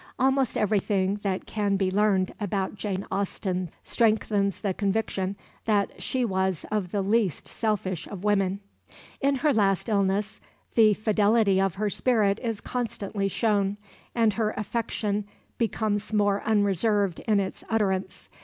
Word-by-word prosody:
Almost 265 Hz, -1 st, +2 dB
everything 200 Hz, -2 st, +1 dB
that 195 Hz, -2 st, -2 dB
can 205 Hz, -2 st, 0 dB
be 190 Hz, -1 st, +1 dB
learned 195 Hz, -2 st, +2 dB
about 200 Hz, -2 st, -1 dB
Jane 200 Hz, -1 st, -3 dB
Austen 185 Hz, -2 st, -2 dB
strengthens 210 Hz, -3 st, +1 dB
the 200 Hz, -3 st, -1 dB
conviction 200 Hz, -1 st, -1 dB, 0.3 s
that 205 Hz, -2 st, 0 dB
she 255 Hz, -2 st, 0 dB
was 190 Hz, -4 st, -1 dB
one 215 Hz, -, +1 dB
of 180 Hz, -3 st, -7 dB
the 200 Hz, -2 st, 0 dB
least 205 Hz, -4 st, +1 dB
selfish 190 Hz, -6 st, -2 dB
of 195 Hz, -2 st, -8 dB
women. 200 Hz, -1 st, +1 dB, 0.6 s
In 280 Hz, 0 st, +2 dB
her 290 Hz, +2 st, +2 dB
last 200 Hz, -1 st, +2 dB
illness 200 Hz, 0 st, 0 dB, 0.3 s
the 215 Hz, -3 st, +5 dB
fidelity 210 Hz, -2 st, +3 dB
of 195 Hz, -2 st, 0 dB
her 210 Hz, +1 st, -1 dB
spirit 215 Hz, -5 st, +2 dB
is 225 Hz, -4 st, -3 dB
constantly 215 Hz, -5 st, -2 dB
shown, 205 Hz, -1 st, +1 dB, 0.4 s
and 225 Hz, -3 st, +3 dB
her 215 Hz, 0 st, -1 dB
affection 210 Hz, -1 st, -2 dB, 0.4 s
becomes 215 Hz, -2 st, -1 dB
more 205 Hz, -2 st, +2 dB
unreserved 205 Hz, -2 st, +2 dB
in 210 Hz, -2 st, +4 dB
its 190 Hz, -1 st, -4 dB
utterance. 190 Hz, -4 st, -1 dB
205 Hz, 140 wpm, -26 LUFS, 195-220 Hz, 0.6 s, the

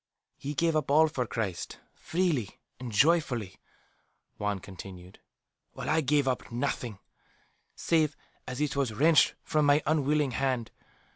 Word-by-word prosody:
"He 145 Hz, +2 st, -5 dB
gave 165 Hz, +2 st, +2 dB
up 155 Hz, -3 st, 0 dB
all 155 Hz, +3 st, +6 dB
for 125 Hz, -5 st, -2 dB
Christ, 105 Hz, -7 st, -3 dB, 0.2 s
freely 160 Hz, -, -1 dB, 0.2 s
and 125 Hz, -2 st, -6 dB
joyfully," 120 Hz, -, +2 dB, 0.8 s
Juan 105 Hz, -1 st, -1 dB
continued. 95 Hz, -1 st, -11 dB, 0.5 s
"While -, -, -3 dB
I 160 Hz, +1 st, +3 dB
gave 145 Hz, -1 st, +2 dB
up 130 Hz, -1 st, -2 dB
nothing, 120 Hz, -3 st, -2 dB, 0.8 s
save 155 Hz, -3 st, +1 dB, 0.3 s
as 125 Hz, 0 st, -5 dB
it 150 Hz, -1 st, 0 dB
was 135 Hz, -6 st, 0 dB
wrenched 155 Hz, +6 st, +5 dB
from 150 Hz, -1 st, +1 dB
my 145 Hz, +2 st, +4 dB
unwilling 150 Hz, -2 st, +2 dB
hand. 125 Hz, -3 st, -1 dB
140 Hz, 135 wpm, -29 LUFS, 115-150 Hz, 0.8 s, all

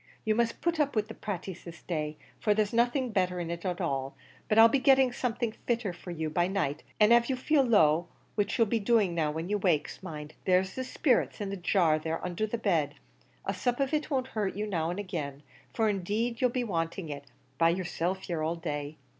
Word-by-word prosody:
You 215 Hz, -, +3 dB
must 230 Hz, +1 st, 0 dB
put 340 Hz, -1 st, 0 dB
up 285 Hz, -3 st, +1 dB
with 215 Hz, 0 st, 0 dB
the -, -, -6 dB
pratees 190 Hz, -3 st, -6 dB
this 170 Hz, -1 st, -11 dB
day, 150 Hz, -3 st, -3 dB, 0.2 s
for 210 Hz, -1 st, +2 dB
there's 210 Hz, 0 st, +1 dB
nothing 240 Hz, +2 st, +2 dB
better 185 Hz, -3 st, 0 dB
in 170 Hz, -1 st, -3 dB
it 170 Hz, 0 st, -5 dB
at 180 Hz, -2 st, -2 dB
all; 135 Hz, -6 st, -2 dB, 0.3 s
but 215 Hz, -, +2 dB
I'll 225 Hz, +1 st, +10 dB
be 265 Hz, +4 st, +2 dB
getting 265 Hz, -1 st, +5 dB
something 240 Hz, -2 st, -1 dB, 0.2 s
fitter 230 Hz, -6 st, 0 dB
for 180 Hz, -, -11 dB
you 160 Hz, -2 st, -3 dB
by 175 Hz, +3 st, +1 dB
night; 160 Hz, -6 st, -1 dB, 0.2 s
an' 210 Hz, +1 st, +6 dB
av' 235 Hz, 0 st, +5 dB
you 265 Hz, -, +1 dB
feel 280 Hz, +3 st, +3 dB
low, 175 Hz, -, +4 dB, 0.3 s
which 205 Hz, +2 st, 0 dB
you'll 230 Hz, -, +5 dB
be 225 Hz, +2 st, 0 dB
doing 205 Hz, -4 st, +2 dB
when 160 Hz, +1 st, -1 dB
you 205 Hz, +1 st, 0 dB
wakes, 170 Hz, -6 st, 0 dB
mind, 150 Hz, -4 st, -7 dB
there's 185 Hz, 0 st, +2 dB
the 260 Hz, -, -3 dB
sperrits 255 Hz, -1 st, +1 dB
in 200 Hz, -2 st, -3 dB
the -, -, -2 dB
jar 175 Hz, -4 st, +2 dB
there 160 Hz, +1 st, -3 dB
undher 180 Hz, +4 st, -1 dB
the 235 Hz, -, -1 dB
bed; 160 Hz, -10 st, +1 dB, 0.5 s
a -, -, -1 dB
sup 245 Hz, 0 st, -1 dB
of 275 Hz, +2 st, 0 dB
it 305 Hz, 0 st, 0 dB
won't 260 Hz, -3 st, -1 dB
hurt 210 Hz, -6 st, -2 dB
you 210 Hz, +1 st, -2 dB
now 170 Hz, -6 st, -1 dB
an' 175 Hz, -, -3 dB
agin, 155 Hz, -8 st, -4 dB, 0.3 s
for 225 Hz, -, +1 dB
indeed 215 Hz, +4 st, -1 dB
you'll 250 Hz, -, +4 dB
be 245 Hz, +1 st, -1 dB
wanting 165 Hz, -3 st, -2 dB
it, 140 Hz, -1 st, -6 dB, 0.3 s
by 165 Hz, -, +5 dB
yerself 180 Hz, +1 st, -1 dB
here 170 Hz, -3 st, -3 dB
all 160 Hz, +2 st, 0 dB
day. 150 Hz, -2 st, -4 dB
195 Hz, 220 wpm, -29 LUFS, 165-230 Hz, 0.5 s, I'll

